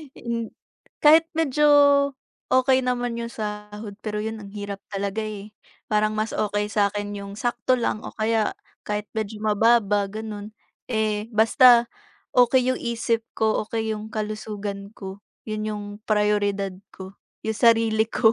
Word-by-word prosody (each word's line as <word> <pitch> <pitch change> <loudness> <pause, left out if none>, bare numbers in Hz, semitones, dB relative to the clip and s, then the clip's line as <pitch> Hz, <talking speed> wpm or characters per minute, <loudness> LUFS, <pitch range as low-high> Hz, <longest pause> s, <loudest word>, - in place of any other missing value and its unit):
In 230 -1 -4 0.5
kahit 320 +2 +7
medyo 300 -2 +2 0.8
okey 260 +1 +4
naman 245 -1 -1
yung 235 0 -5
sahod, 210 -1 -6
pero 210 -1 -3
'yon, 220 0 -4
ang 200 -1 -10
hirap 200 -1 -5
talaga, 200 +1 -2
eh. 210 -1 -7 0.4
Parang 215 0 +2
mas 215 +1 -1
okey 210 0 -1
sa'kin 205 0 0
yung 200 0 -7
sakto 240 +2 0
lang 230 -3 -1
o - - -7
kaya 220 0 +1 0.3
kahit 210 0 -2
medyo 220 -1 -4
mababa 210 -1 +3
gano'n. 215 0 -7 0.3
Eh, 215 -2 -1
basta 235 +2 +6 0.4
okey 250 +1 +4
yung 255 - -3
isip 230 -1 -1
ko, 220 -1 +1
okey 225 -1 -2
yung 215 0 -5
kalusugan 210 -2 -5
ko. 195 0 -8 0.3
'Yon 215 0 -3
yung 210 0 -5 0.2
prioridad 205 -2 +1 0.2
ko, 190 +1 -10 0.3
yung 220 -1 -2
sarili 225 -2 +4
ko. 225 0 +4
215 Hz, 140 wpm, -24 LUFS, 210-230 Hz, 0.8 s, kahit